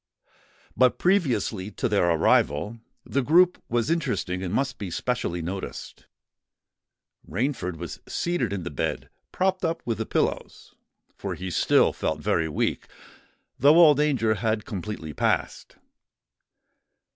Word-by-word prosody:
But 130 -1 +3
previously 130 - +1
to - - -1
their 100 -6 +2
arrival, 85 +5 +2 0.3
the 140 - 0
group 175 +7 +4
was 120 +5 0
interesting 115 - -1
and 90 -2 -4
must 135 +6 -1
be 100 -4 -4
specially 85 -4 -2
noticed. 95 +3 -7 1.2
Rainford 100 - -2
was 85 0 -7
seated 170 - -1
in 100 -3 -3
the 85 - -5
bed, 70 - -3 0.2
propped 190 0 0
up 165 0 -1
with 115 -3 -2
the 110 - -3
pillows; - - -2 0.4
for - - -5
he 95 0 -6
still - - +3
felt 80 - -2
very 80 +2 0
weak, 75 - -1 0.7
though 145 +5 +6
all 165 -4 +8
danger 135 -7 +1
had 110 -1 -1
completely 95 -5 -6
passed. - - -1
110 Hz, 130 wpm, -25 LUFS, 90-145 Hz, 1.2 s, all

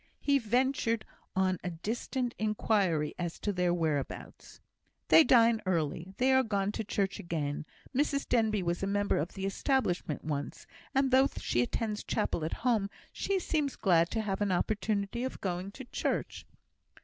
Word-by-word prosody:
He 280 -1 +3
ventured 235 -1 +1 0.3
on 185 -1 +2
a 180 - -2
distant 235 +8 -3
inquiry 200 -7 +1
as 175 -1 -3
to 205 - -2
their 180 -1 +1
whereabouts. 155 -5 -3 0.5
"They 325 - +9
dine 230 -4 +5
early; 170 +1 -1
they 260 +1 +3
are 260 - +6
gone 205 -4 0
to 220 - -3
church 195 -1 -1
again. 150 -3 -3 0.3
Mrs 280 0 +1
Denbigh 220 -5 +2
was 170 0 -1
a 195 - 0
member 205 0 +1
of 160 +5 -3
the 195 -1 -4
Establishment 195 - 0
once; 145 -2 -4 0.3
and, 270 -1 +3
though 265 +1 +6
she 120 - 0
attends 210 - -2
chapel 210 -6 -1
at 160 - -2
home, 220 -5 +2 0.2
she 395 - 0
seems 305 -6 -1
glad 170 -3 +3
to 220 - -1
have 200 -2 -2
an 205 -2 +1
opportunity 210 +3 0
of 260 - -4
going 185 0 -3
to 265 - -9
church." - - -3
205 Hz, 160 wpm, -31 LUFS, 175-240 Hz, 0.5 s, They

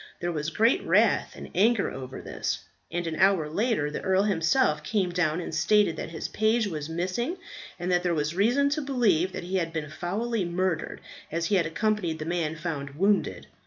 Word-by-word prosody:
There 175 0 -1
was 150 -1 -2
great 225 - +3
wrath - - +3
and - - -9
anger 225 +2 +3
over 130 0 -7
this; - - -3 0.3
and 175 +1 -2
an 160 -1 -3
hour 190 -5 +4
later 180 -3 0
the - - -4
earl 190 +1 +2
himself 165 - +2
came 190 -1 0
down 175 -2 +1
and 175 - -5
stated 210 -6 +3
that - - -4
his 160 -1 -5
page 220 +1 +2
was 155 -6 -4
missing, 185 - -2 0.4
and 180 0 -2
that 175 0 +3
there 175 -1 0
was 150 +1 -1
reason 240 +10 +3
to 305 +1 0
believe 220 - +2
that - - -6
he 185 +2 -1
had 165 -2 -1
been 155 -2 -4
foully 210 +6 -2
murdered, 175 -1 -2 0.3
as 165 +2 -1
he 200 - +2
had 170 -2 +1
accompanied 180 -1 0
the 155 - -5
man 165 -2 -1
found 145 -4 -5
wounded. 200 +5 +1
175 Hz, 200 wpm, -27 LUFS, 160-210 Hz, 0.4 s, hour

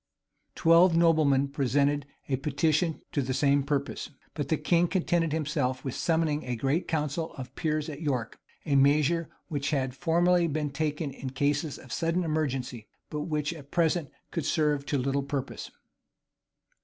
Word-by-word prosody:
[] - - -48
Twelve 165 +1 +5
noblemen 155 -5 +4
presented 140 +1 +1 0.2
a 135 - 0
petition 150 +4 0
to 145 - 0
the 130 0 -2
same 140 0 +3
purpose.[] 140 0 -2 0.2
But 145 -3 -3
the 160 - +1
king 170 +3 +2
contented 170 -2 +1
himself 145 -5 -1
with 130 - -2
summoning 160 -2 0
a 125 -1 -3
great 135 +9 0
council 155 +1 -2
of 130 -2 -7
the - - -37
peers 155 -2 -1
at 150 -1 -7
York; 130 -7 -2 0.3
a 145 -3 +1
measure 150 +4 +3 0.2
which 145 -4 -2
had 130 -3 0
formerly 175 +2 +3
been 150 -2 -2
taken 150 0 -2
in 135 0 -6
cases 145 +3 0
of 130 - -10
sudden 165 +2 0
emergency, 135 -8 -2 0.2
but 150 -1 -3
which 150 0 -1
at 145 -4 -12
present 165 -2 +1 0.2
could 165 -5 -2
serve 150 -3 +1
to 145 - +1
little 135 +2 0
purpose. 140 -1 -4
150 Hz, 165 wpm, -28 LUFS, 140-160 Hz, 0.3 s, Twelve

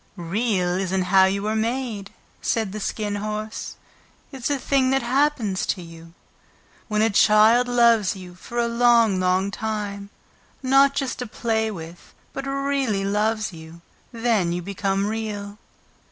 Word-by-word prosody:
"Real 185 0 -1
isn't 190 0 0
how 190 +1 +5
you 200 +2 -1
are 215 +1 0
made," 225 -3 -2 0.3
said 220 -4 -1
the 215 - -5
Skin 205 0 -3
Horse. 215 +1 -5 0.6
"It's 265 -2 -4
a 285 - +1
thing 265 0 +1
that 270 -1 +1
happens 245 -6 +1
to 185 - -1
you. 165 0 -13 0.7
When 215 -1 +1
a 225 - +2
child 215 +4 +5
loves 235 -5 +3
you 180 -2 -10
for 210 +6 -9
a 235 0 +2
long, 235 -4 +4
long 185 +2 +1
time, 205 -2 -4 0.5
not 275 +1 +4
just 270 -2 -2
to 250 - -4
play 220 0 -1
with, 170 -3 -10 0.2
but 275 - -5
REALLY 275 -7 -1
loves 215 0 0
you, 160 +1 -12 0.3
then 225 -7 +1
you 175 0 -3
become 195 +1 -1
Real." 210 -1 -4
215 Hz, 150 wpm, -23 LUFS, 195-235 Hz, 0.7 s, how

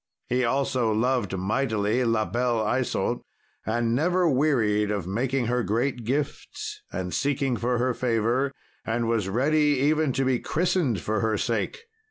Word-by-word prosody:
He 125 +1 +1
also 125 -2 +1
loved 115 -3 0
mightily 110 +3 0
La 115 -2 +1
Belle 115 +3 0
Isault, 120 +4 0 0.5
and 115 +1 +1
never 175 +7 +2
wearied 120 -8 +2
of 100 -4 -2
making 120 +7 -1
her 125 +2 +1
great 120 +2 -1
gifts, 140 +4 -3
and 90 -1 -4
seeking 135 -2 0
for 120 +1 0
her 125 +1 +1
favour, 120 +3 0 0.3
and 115 +1 -1
was 110 -4 0
ready 145 +6 +2
even 150 +1 +2
to 135 - 0
be 130 -2 +2
christened 160 - 0
for 110 +3 -1
her 110 0 +1
sake. 465 - -2
120 Hz, 150 wpm, -26 LUFS, 110-135 Hz, 0.5 s, never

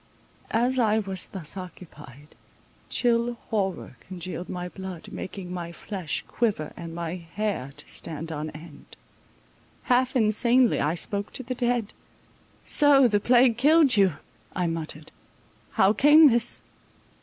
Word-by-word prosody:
As 250 +3 +2
I 220 -2 +3
was 195 -3 -3
thus 180 -4 -6
occupied, 155 -6 -11 0.6
chill 240 0 +1 0.2
horror 195 -4 -2
congealed 180 -1 -7
my 180 -1 -4
blood, 185 -2 -8
making 185 -1 -7
my 170 -2 -5
flesh 180 -2 -4
quiver 205 -10 -1
and 165 -1 -8
my 170 +1 -4
hair 175 -4 -4
to - - -13
stand 165 0 -6
on 155 0 -4
end. 155 0 -13 0.9
Half 255 0 +2
insanely 235 +2 +3
I 150 +4 0
spoke 200 +3 -2
to 260 - -5
the 255 +1 -4
dead. 240 -3 -1 0.7
So 285 -3 +5
the 205 -3 +2
plague 240 +1 +4
killed 295 -1 +5
you, 195 -4 +4 0.4
I 180 - 0
muttered. 160 -2 -5 0.6
How 190 +2 +4
came 295 +4 +7
this? 235 -1 +1
195 Hz, 130 wpm, -26 LUFS, 170-240 Hz, 0.9 s, came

